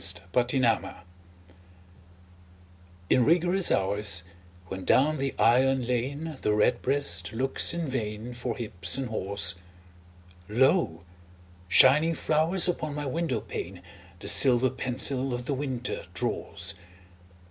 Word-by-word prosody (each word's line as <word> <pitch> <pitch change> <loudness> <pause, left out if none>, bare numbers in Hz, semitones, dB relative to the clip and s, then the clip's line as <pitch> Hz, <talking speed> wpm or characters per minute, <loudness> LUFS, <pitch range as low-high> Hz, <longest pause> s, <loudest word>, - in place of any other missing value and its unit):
XVII—WINTER 125 -2 0 2.1
In 125 - +4
rigorous 175 +5 +2
hours, 100 -2 +1 0.4
when 95 +1 -8
down 150 +7 +2
the 135 0 -3
iron 130 +2 +2
lane 135 +5 -4
The 105 - 0
redbreast 105 -5 +1
looks 130 +4 +1
in 170 -2 -4
vain 115 -2 -5
For 120 -1 -5
hips 95 -3 0
and 135 -3 -4
haws, 100 -3 0 1.0
Lo, 120 - +1 0.7
shining 150 - +5
flowers 160 +5 +2
upon 155 -4 -3
my 150 0 -5
window 140 -5 -3
pane 90 0 -8 0.4
The - - -8
silver 130 -2 +5
pencil 130 0 0
of 120 0 -7
the 140 - -2
winter 130 -7 -4
draws. - - -2
130 Hz, 110 wpm, -26 LUFS, 105-145 Hz, 2.1 s, shining